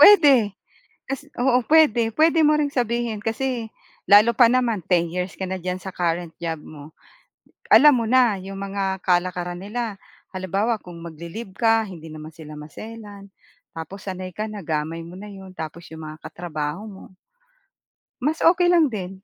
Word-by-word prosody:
pwede. 280 - +7 0.5
Kasi 275 +2 -5
oo 250 0 +3
puwede 295 -8 +5
puwede 320 +6 +4
mo 300 0 +5
ring 290 -2 0
sabihin 235 -3 -1
kasi, 230 +2 -2 0.4
lalo 210 +3 +7
pa 240 - +7
naman 240 -4 +1
10 170 -2 +2
years 180 +1 -3
ka 190 - -4
na 190 - -2
diyan 180 +1 -2
sa 190 - -7
current 170 -1 -1
job 165 -2 -3
mo. 150 0 -12 0.8
Alam 255 +1 +7
mo - - -2
na 245 -3 +4
'yong 195 +1 -8
mga 195 -1 -2
kalakaran 180 -1 0
nila, 215 +2 -4 0.4
halimbawa 195 +5 -1
kung 170 -3 -11
mag-li-leave 170 +6 -8
ka 225 0 +3
hindi 165 -4 -10
naman 155 0 -9
sila 155 -1 -11
maselan, 205 +5 -10 0.5
tapos 190 +5 -8
sanay 185 -1 -5
ka 215 +1 -3
na 210 -2 -7
gamay 160 +1 -2
mo 170 +2 -10
na 210 - -9
'yon 190 -1 -11
tapos 160 +1 -7
'yong 160 0 -8
mga 155 0 -8
katrabaho 155 +1 -5
mo. 195 -3 -11 1.2
Mas 305 +4 0
okey 355 0 +3
lang 340 -3 +5
din. 190 -6 -5
200 Hz, 165 wpm, -23 LUFS, 175-235 Hz, 1.2 s, pwede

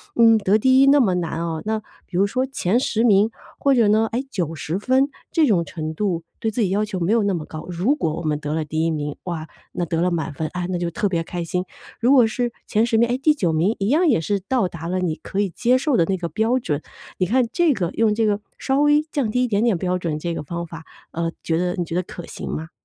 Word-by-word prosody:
嗯， 225 -1 +6
得 200 +1 +3
第 260 +4 +4
1 275 - +6
那 285 +1 +6
么 210 -9 +3
难 165 -2 -2
哦， 165 -2 -3
那 220 0 0 0.3
比 175 - -4
如 195 - +4
说 255 +6 0
前 240 -4 0
10 230 -3 0
名， 210 -2 +5 0.3
或 275 -1 +3
者 230 -4 +4
呢， 220 +2 +3
哎， 245 +3 -1
90 165 - -3
分， 260 +5 +2 0.2
这 325 -3 +4
种 195 -10 +3
程 155 0 -5
度 175 -2 -1 0.2
对 225 - 0
自 220 +2 -2
己 200 - +2
要 200 +3 +1
求 200 -3 -4
没 175 +3 0
有 230 - +3
那 200 -1 +1
么 160 -3 -4
高。 155 0 -8
如 180 - +1
果 160 - -1
我 170 - -5
们 150 -2 0
得 150 0 -3
了 160 -1 -1
第 155 +2 -1
1 - - +2
名， 150 -2 -3
哇， 165 -3 -4 0.3
那 175 - -1
得 165 0 -1
了 180 - +2
满 165 -3 -2
分， 155 +2 -3
啊， 180 -1 -2
那 180 - -1
就 175 -1 -1
特 215 +3 -1
别 170 -3 -1
开 175 +1 -4
心； 180 +2 -2 0.4
如 240 +3 +3
果 260 -4 +7
是 240 +2 -1 0.2
前 220 +1 +2
10 235 -1 +1
名， 235 +1 +4
哎， 245 - +1
第 300 +3 +3
9 180 - 0
名 175 +8 +2
一 195 - 0
样 330 +6 +3
也 235 - +3
是 200 +4 0
到 250 -7 +2
达 165 -1 -7
了 185 +2 -1
你 175 -4 -1
可 190 - -5
以 200 - 0
接 245 +8 +2
受 270 -1 +1
的 170 - +4
那 195 - 0
个 170 -1 -4
标 225 +9 +1
准， 155 - -2 0.4
你 185 - +1
看 245 +7 +2
这 345 -4 +3
个 180 -7 -2
用 220 -2 +2
这 225 0 +1
个 205 -1 +1 0.2
稍 270 +1 0
微 295 0 +5
降 275 -7 0
低 250 +3 +1
一 - - +1
点 205 0 +1
点 225 -6 +2
标 180 +1 -1
准， 165 -4 -3
这 170 +2 -3
个 - - -4
方 170 +3 -5
法， 165 -1 -10 0.3
呃， 165 0 -2
觉 160 - 0
得 180 +1 0
你 180 - -1
觉 165 - -7
得 180 - +2
可 175 -1 -9
行 - - -7
吗？ 160 +1 -4
190 Hz, 280 characters per minute, -22 LUFS, 165-235 Hz, 0.4 s, 果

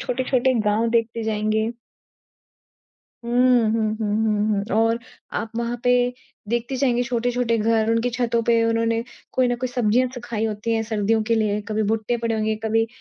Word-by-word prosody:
छोटे-छोटे 255 0 +1
गाँव 225 +3 +1
देखते 230 0 0
जाएँगे। 220 +1 0 1.5
हुँ। 235 - -5 0.4
हुँ, 225 -1 +1
हुँ, 210 -2 -1
हुँ, 210 -1 +1
हुँ 225 - -1
और 225 +1 +2 0.4
आप 225 - -5
वहाँ 235 +1 -2
पे 245 - +4 0.6
देखते 240 +3 -1
जाएँगे 245 -2 +2
छोटे-छोटे 240 -1 0
घर, 220 0 +2
उनकी 230 +2 +1
छतों 235 -1 0
पे 230 -1 +4
उन्होंने 230 0 +1 0.3
कोई 255 -1 +2
न 245 - 0
कोई 255 +1 -3
सब्जियाँ 245 0 +2
सुखाई 235 -3 -4
होती 220 +1 -2
है 225 - 0
सर्दियों 220 0 0
के 230 +1 +1
लिए। 210 -1 +1
कभी 215 0 0
भुट्टे 225 +2 0
पड़े 230 -1 -1
होंगे, 220 0 0
कभी 225 +1 +2
230 Hz, 165 wpm, -22 LUFS, 220-240 Hz, 1.5 s, पे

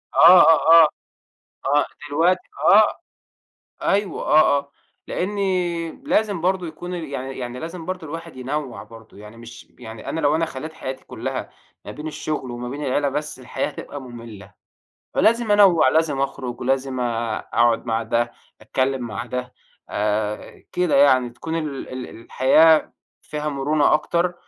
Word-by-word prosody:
آه، 175 +2 +9
آه، 165 +1 +7
آه، - - +5 0.8
آه 145 +1 +3 0.2
دلوقتي 170 +5 +2 0.3
آه، - - +5 0.8
أيوه 200 0 0
آه، 150 -2 +4
آه، 140 0 -13 0.4
لأنّي 180 -4 -1
لازم 215 - -1
برضه 185 -1 0
يكون 175 +3 -7
يعني 140 -6 -5
يعني 125 0 -5
لازم 165 0 -7
برضه 185 -3 -5
الواحد 165 -4 -8
ينوّع 135 +1 -4
برضه، 115 -2 -15
يعني 105 +2 -12
مش 115 +1 -12
يعني 110 0 -9
أنا 160 - -3
لو 145 +1 +2
أنا 165 0 +1
خلّيت 155 +2 -7
حياتي 130 -3 -7
كُلها - - -5 0.4
ما - - -6
بين 150 +1 -7
الشغل 150 -4 -4
وما 120 0 -6
بين 145 +2 -5
العيلة 140 +2 +1
بس، 150 0 -4
الحياة 125 - -3
هتبقى 145 - -8
مملّة، 115 -6 -11 0.6
فلازم 230 0 +2
أنوّع، 195 -8 +6
لازم 150 -1 +1
أخرج 135 -2 -4
ولازم 130 0 -1
آآ، 115 -2 -1
أقعد 120 +1 +2
مع 115 0 0
ده، 120 +1 -1 0.3
أتكلم 130 +4 -1
مع 115 +1 -5
ده 125 0 -5 0.4
آآ، 105 0 -2
كده 180 -5 +1
يعني، 130 -3 +4
تكون 160 +7 -5
ال 150 -4 -4
ال 130 -1 -6
الحياة 155 +6 +4 0.3
فيها 150 0 -4
مرونة 145 +2 +2
أكتر 175 +3 0
145 Hz, 150 wpm, -22 LUFS, 125-165 Hz, 0.8 s, آه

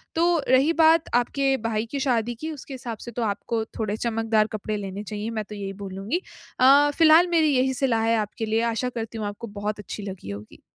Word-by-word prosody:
तो 335 +1 +3 0.2
रही 270 +5 +4
बात 320 0 +5
आपके 270 +3 +2
भाई 220 0 -1
की 280 - -2
शादी 240 -3 0
की, 315 +7 -5
उसके 285 -2 -9
हिसाब 240 -3 -6
से 240 - -7
तो 240 - -4
आपको 220 +2 -2 0.2
थोड़े 215 -1 -1
चमकदार 225 -2 +1
कपड़े 215 +1 -3
लेने 200 0 -5
चाहिए, 210 +1 -5
मैं 215 -2 -3
तो 210 - -9
यही 195 -1 -5
बोलूँगी। 195 - -3 0.4
अ, 280 +3 +6
फिलहाल 325 +2 +7
मेरी 310 -3 +3
यही 260 +1 +2
सलाह 240 -4 +1
है 230 0 +3
आपके 215 +1 -3
लिए, 220 +1 +1
आशा 250 +3 -1
करती 230 -2 -6
हूँ 210 - -2
आपको 205 +3 -7
बहुत 210 0 -2
अच्छी 210 +1 -7
लगी 190 - -7
होगी। 105 +1 -10
225 Hz, 210 wpm, -24 LUFS, 210-265 Hz, 0.4 s, फिलहाल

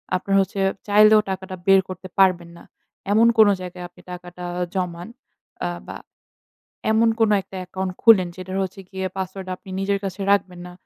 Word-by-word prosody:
আপনার 195 +2 -1
হচ্ছে 195 +1 -4 0.3
চাইলেও 215 +1 +6
টাকাটা 190 0 -5
বের 195 0 +7
করতে 185 0 -8
পারবেন 180 -3 +3
না। - - -14 0.5
এমন 225 +2 +5
কোন 215 -1 +7
জায়গায় 180 0 -7
আপনি 175 - -19
টাকাটা 180 0 -9 0.3
জমান, 175 -1 -3 0.6
আ - - 0 0.2
বা, - - -7 1.0
এমন 225 +1 +4
কোনো 215 -1 +4
একটা 190 - -12
অ্যাকাউন্ট 185 +1 -4
খুলেন, 200 -6 +6
যেটার 185 +1 -6
হচ্ছে 190 +1 -6
গিয়ে 190 -1 -4
পাসওয়ার্ড 190 0 -5
আপনি - - -19
নিজের 200 0 0
কাছে 195 +1 -5
রাখবেন 185 -3 0
না। 180 - -10
190 Hz, 165 wpm, -22 LUFS, 180-200 Hz, 1.0 s, বের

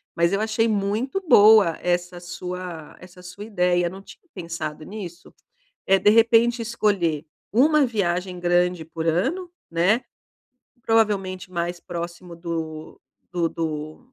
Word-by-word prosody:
Mas 170 +1 +2
eu 200 - +1
achei 220 +1 +1
muito 215 - -1
boa 205 - +7
essa 175 0 -1
sua 180 -2 -7
essa 180 0 -14
sua 180 +3 -9
ideia, 180 -4 +1
não 190 +2 -10
tinha 200 - -15
pensado 165 -4 -6
nisso. 185 -4 -9 0.5
É 195 0 +5
de 205 - +4
repente 230 +2 +4
escolher 200 -9 0 0.3
uma 290 +4 +5
viagem 185 -5 -1
grande 175 -1 +1
por 160 0 -6
ano, 330 - 0 0.2
né. 185 +9 +2 0.8
Provavelmente 195 -5 0
mais 175 0 -2
próximo 170 +1 -7
do 165 -2 -6 0.3
do 175 -2 0
do 160 +10 -5
180 Hz, 125 wpm, -23 LUFS, 170-215 Hz, 0.8 s, boa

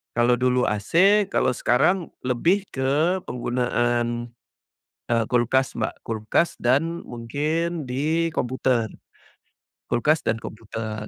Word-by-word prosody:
Kalau 120 +1 +4
dulu 125 0 +2
AC, 185 - +3
kalau 130 - +2
sekarang 175 +10 +2 0.2
lebih 165 +11 +1
ke 145 +8 +1
penggunaan, 120 -1 -1 0.8
eee, 115 -1 +3
kulkas 125 +2 +1
Mbak. 110 - -2
Kulkas 110 +9 0
dan 155 +8 +1
mungkin 155 +8 -2
di 155 +6 0
komputer. 125 -4 0 1.0
Kulkas 150 +7 +2
dan 110 0 0
komputer. 110 -1 -6
125 Hz, 105 wpm, -24 LUFS, 120-160 Hz, 1.0 s, Kalau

